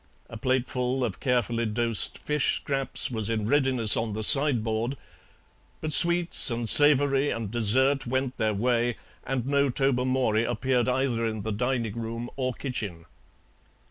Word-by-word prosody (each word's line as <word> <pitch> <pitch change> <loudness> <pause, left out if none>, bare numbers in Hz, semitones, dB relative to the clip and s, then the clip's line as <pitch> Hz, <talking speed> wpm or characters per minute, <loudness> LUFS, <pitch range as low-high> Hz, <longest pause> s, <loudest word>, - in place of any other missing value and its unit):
A - - -8
plateful 130 +1 -2
of 95 -6 -6
carefully 120 -2 -1
dosed 115 +1 -2
fish 150 -2 -1
scraps 135 0 -3
was 110 -2 -3
in 110 -2 -2
readiness 130 -4 +2
on 110 -2 -3
the 110 +1 -4
sideboard, 120 -2 +3 0.8
but 155 -1 -2
sweets 175 0 +5
and 120 -1 -3
savoury 145 0 +5
and 110 -3 -5
dessert 130 +5 +1
went 130 +1 -3
their 110 -1 -1
way, 120 +2 -1 0.3
and 130 -2 -3
no 140 0 +1
Tobermory 130 -4 0
appeared 120 +1 -1
either 125 -3 -1
in 110 -2 -5
the 110 - -4
dining 115 0 -2
room 115 +1 -6
or 130 -1 -2
kitchen. 105 - -6
125 Hz, 140 wpm, -25 LUFS, 115-135 Hz, 0.8 s, sweets